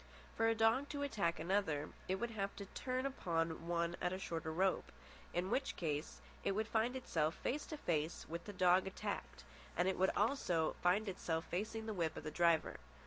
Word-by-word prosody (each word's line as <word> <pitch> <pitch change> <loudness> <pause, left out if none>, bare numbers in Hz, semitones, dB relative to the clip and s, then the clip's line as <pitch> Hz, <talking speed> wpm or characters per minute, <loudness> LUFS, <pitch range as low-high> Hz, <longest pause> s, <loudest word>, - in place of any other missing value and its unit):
For 225 - +3
a 225 - +3
dog 225 +6 +3
to 285 -1 -2
attack 170 - 0
another, 160 -4 +1 0.2
it 190 - +1
would 235 +4 -2
have 200 -2 -2
to 200 - -6
turn 255 +6 -2
upon 165 -10 -1
one 170 0 +1
at 180 - +1
a 185 - -2
shorter 165 -4 -3
rope. 185 +4 +1 0.4
In 180 +2 -1
which 270 +1 +1
case 150 -3 -2 0.2
it - - +2
would 215 +2 0
find 230 +3 +1
itself 160 -11 0
face 290 +4 -2
to 310 - -5
face 160 - -1
with 170 +1 -5
the 205 - -5
dog 185 0 +4
attacked, 190 - -4 0.3
and 175 - +3 0.3
also 205 - +2
it - - +2
would - - -7
find 190 +5 +3
itself 165 -3 -1
facing 220 +4 -2
the 220 - -2
whip 170 -5 -1
of - - -5
the 155 - -4
driver. 170 0 +3
185 Hz, 195 wpm, -38 LUFS, 170-225 Hz, 0.4 s, dog